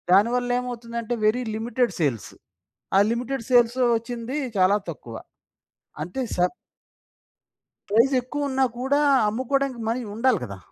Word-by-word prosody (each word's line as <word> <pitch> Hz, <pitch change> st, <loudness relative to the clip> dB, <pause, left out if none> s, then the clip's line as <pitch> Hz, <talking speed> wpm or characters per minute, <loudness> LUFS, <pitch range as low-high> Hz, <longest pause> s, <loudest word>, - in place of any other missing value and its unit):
దానివల్లేమవుతుందంటే, 240 Hz, +2 st, +1 dB
very 220 Hz, +4 st, +3 dB
limited 240 Hz, +2 st, 0 dB
sales. 130 Hz, -, -1 dB, 0.7 s
ఆ -, -, +7 dB
limited 245 Hz, +2 st, -2 dB
sales 240 Hz, 0 st, +4 dB, 0.2 s
ఒచ్చింది 235 Hz, +3 st, -5 dB, 0.2 s
చాలా 190 Hz, +2 st, +4 dB
తక్కువ. 120 Hz, -7 st, -8 dB, 0.9 s
అంటే 180 Hz, +11 st, -5 dB
స -, -, -10 dB, 1.5 s
ప్రైసెక్కువ 255 Hz, +5 st, +2 dB
ఉన్నా 265 Hz, 0 st, +2 dB
కూడా 270 Hz, +3 st, +1 dB, 0.3 s
అమ్ముకోవడానికి 260 Hz, +3 st, -1 dB
మనీ 235 Hz, +3 st, 0 dB
ఉండాలి 235 Hz, -2 st, +2 dB
కదా! 100 Hz, -4 st, -8 dB
240 Hz, 105 wpm, -24 LUFS, 220-255 Hz, 1.5 s, ఆ